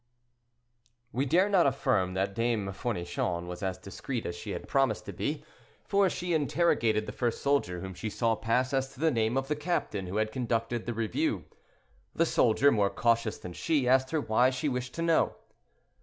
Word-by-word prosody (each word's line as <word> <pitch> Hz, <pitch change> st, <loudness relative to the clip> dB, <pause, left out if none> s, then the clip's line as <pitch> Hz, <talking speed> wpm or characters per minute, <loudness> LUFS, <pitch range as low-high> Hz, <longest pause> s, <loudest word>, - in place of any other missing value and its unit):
We 135 Hz, +3 st, -1 dB
dare 180 Hz, +8 st, +4 dB
not 190 Hz, -6 st, +4 dB
affirm 110 Hz, -9 st, +1 dB
that 95 Hz, +1 st, 0 dB
Dame 115 Hz, -3 st, 0 dB
Fournichon 90 Hz, -5 st, -2 dB
was 90 Hz, 0 st, -7 dB
as 95 Hz, -2 st, -2 dB
discreet 115 Hz, +5 st, -5 dB
as 85 Hz, -, -3 dB
she 95 Hz, +5 st, -8 dB
had -, -, -5 dB
promised 135 Hz, -6 st, +1 dB
to -, -, -6 dB
be, -, -, -3 dB, 0.4 s
for 200 Hz, -1 st, +3 dB
she 175 Hz, 0 st, -2 dB
interrogated 145 Hz, -8 st, +2 dB
the -, -, -5 dB
first 120 Hz, -2 st, -1 dB
soldier 140 Hz, -12 st, +1 dB
whom 95 Hz, 0 st, -6 dB
she 110 Hz, +5 st, -4 dB
saw 115 Hz, +2 st, +1 dB
pass 125 Hz, +4 st, 0 dB
as 135 Hz, 0 st, 0 dB
to -, -, -16 dB
the 160 Hz, +1 st, +3 dB
name 115 Hz, 0 st, +1 dB
of 135 Hz, 0 st, -1 dB
the 150 Hz, -, 0 dB
captain 150 Hz, -, -2 dB
who 90 Hz, -, -5 dB
had 110 Hz, 0 st, 0 dB
conducted 115 Hz, -1 st, -2 dB
the 120 Hz, -, -2 dB
review. 110 Hz, -1 st, -1 dB, 0.7 s
The 165 Hz, -, +3 dB
soldier, 135 Hz, -1 st, +4 dB
more 105 Hz, -4 st, +2 dB
cautious 115 Hz, -1 st, +1 dB
than 90 Hz, -, -8 dB
she, 145 Hz, -, 0 dB
asked 130 Hz, +1 st, +4 dB
her 160 Hz, -2 st, 0 dB
why 120 Hz, +1 st, +3 dB
she 130 Hz, +4 st, -2 dB
wished 125 Hz, -2 st, -3 dB
to 165 Hz, -, -2 dB
know. 165 Hz, -1 st, +2 dB
120 Hz, 190 wpm, -29 LUFS, 105-140 Hz, 0.7 s, dare